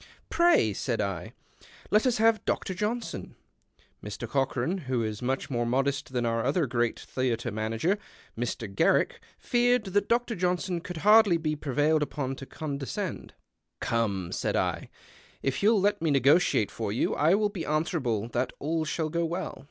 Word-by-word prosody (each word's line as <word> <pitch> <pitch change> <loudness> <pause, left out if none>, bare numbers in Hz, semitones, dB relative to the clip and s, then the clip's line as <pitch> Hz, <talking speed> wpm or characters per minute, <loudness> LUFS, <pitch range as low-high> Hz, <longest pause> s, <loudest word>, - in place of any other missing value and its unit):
" - - -33
Pray," 340 - +4
said 115 +3 -2
I, 95 -4 -3 0.3
" - - -22
let 215 +5 +4
us 245 - +2
have 225 -1 +3
Dr. 190 - -1
Johnson." 215 +5 -3 0.7
Mr. 105 +3 -6
Cochran, 135 - 0
who 125 -3 +1
is 110 -1 -4
much 130 +3 -2
more 120 -2 0
modest 135 +3 0
than 125 -2 -1
our 115 0 0
other 150 +5 +1
great 120 -2 0
theatre 125 -2 -2
manager, 115 - -1 0.4
Mr. 115 -1 -3
Garrick, - - +2 0.2
feared 245 0 +2
that 200 +1 0
Dr. 240 0 +1
Johnson 180 0 -1
could 180 0 -7
hardly 210 -4 +7
be 155 -2 -1
prevailed 150 +2 +1
upon 135 -2 -2
to 135 - -9
conde 145 -3 -5
scend. - - -5 0.2
" - - -56
Come," 100 -6 -1
said - - -1
I, - - -1 0.3
" - - -27
if 135 0 -1
you'll 210 -1 +4
kt 205 -3 +2
me 165 - +1
negotiate 140 - +3
for 110 -3 -3
you, 110 - 0
I 160 +5 +4
will 210 0 +1
be 195 -5 -5
answerable 150 - -1
that 125 +2 -1
all 160 +2 -1
shall 155 0 -2
go 170 +2 0
well." 170 +1 -3
145 Hz, 175 wpm, -28 LUFS, 120-185 Hz, 0.7 s, hardly